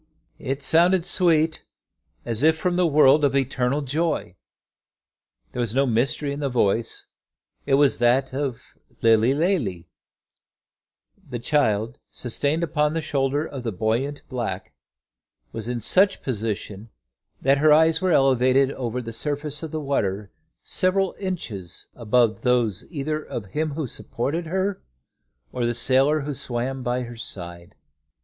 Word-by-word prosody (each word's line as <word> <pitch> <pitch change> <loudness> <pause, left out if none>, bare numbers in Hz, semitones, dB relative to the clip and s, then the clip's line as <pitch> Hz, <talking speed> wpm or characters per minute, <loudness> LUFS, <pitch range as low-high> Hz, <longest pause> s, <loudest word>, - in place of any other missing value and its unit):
It 135 +1 -4
sounded 175 +3 +4
sweet 165 -4 +2 0.6
as 115 -1 -3
if 160 +1 +4
from 180 +2 0
the 180 -1 +3
world 150 -1 +5
of 140 -1 +2
eternal 135 +1 0
joy. 150 - -2 1.2
There - - -6
was 120 -1 -2
no 135 +1 +3
mystery 135 +4 0
in 140 - -6
the 140 -2 -1
voice; 115 -2 0 0.6
it 135 - +4
was 140 -3 +3
that 125 +3 +2
of 135 -4 -4 0.3
the 115 0 +6
Lilly 115 +5 +2
Lalee. 145 - 0 1.4
The 125 - -4
child, 115 -3 0
sustained 145 +7 -1
upon 150 -1 0
the 165 - 0
shoulder 145 0 0
of 135 -4 -7
the 120 -2 -3
buoyant 115 +9 -2
black, 115 -7 -4 0.8
was 115 +1 -6
in 120 -1 -2
such 190 - +4
a - - -22
position 110 -3 -4 0.5
that 135 +1 +3
her 155 +1 +5
eyes 160 +1 +4
were 185 - +1
elevated 135 -1 +3
over 125 -2 -4
the 115 0 -7
surface 145 +4 -3
of 160 - -5
the 155 - -4
water 105 -9 -2 0.3
several 190 0 +1
inches 115 - -6
above 115 -1 +1
those 120 -6 +1
either 155 -1 -3
of 110 - -6
him 150 +9 -3
who 155 0 -3
supported 145 +7 -3
her, 190 +3 -1 0.7
or 125 - -3
the 120 0 0
sailor 135 +5 +3
who 145 +1 -4
swam 130 +1 -3
by 125 +1 -1
her 120 0 -8
side. 85 -6 -8
135 Hz, 145 wpm, -23 LUFS, 120-155 Hz, 1.4 s, the